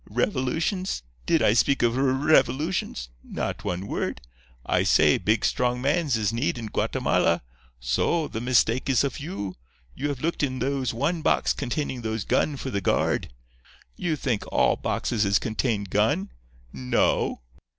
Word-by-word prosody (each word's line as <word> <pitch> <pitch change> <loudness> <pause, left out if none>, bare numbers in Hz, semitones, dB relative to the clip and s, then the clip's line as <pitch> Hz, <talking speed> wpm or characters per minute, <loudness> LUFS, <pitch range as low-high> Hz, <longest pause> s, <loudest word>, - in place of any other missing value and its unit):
Revolutions? 160 - -1 0.2
Did - - +3
I - - +5
speak 140 - +2
of 120 0 +2
r 135 - +1
r - - +2
revolutions? 140 - +1
Not - - -4
one 90 +2 -3
word. - - -3 0.5
I - - +2
say, - - +4
big, 110 +2 +1
strong 125 0 +1
mans 145 -1 +1
is 105 -1 0
need 125 +3 0
in 115 -2 -5
Guatemala. - - +1 0.4
So. 65 - 0
The 110 - -5
mistake 125 +1 +2
is 130 -2 +3
of 140 -3 -2
you. 140 - -5 0.4
You 145 - -3
have 140 -3 -4
looked 165 +2 -1
in 130 -3 0
those 130 -1 -1
one 145 +8 -1
box - - +2
containing 135 -1 -3
those 110 -2 -2
gun 145 -2 +1
for 130 - -5
the 100 - -1
guard. - - 0 0.6
You 170 -3 -1
think 125 -7 -1
all - - +3
boxes 110 -3 -1
is 100 -1 +3
contain 110 0 -1
gun? 100 - 0 0.4
No. 65 -2 0
125 Hz, 160 wpm, -25 LUFS, 110-145 Hz, 0.6 s, I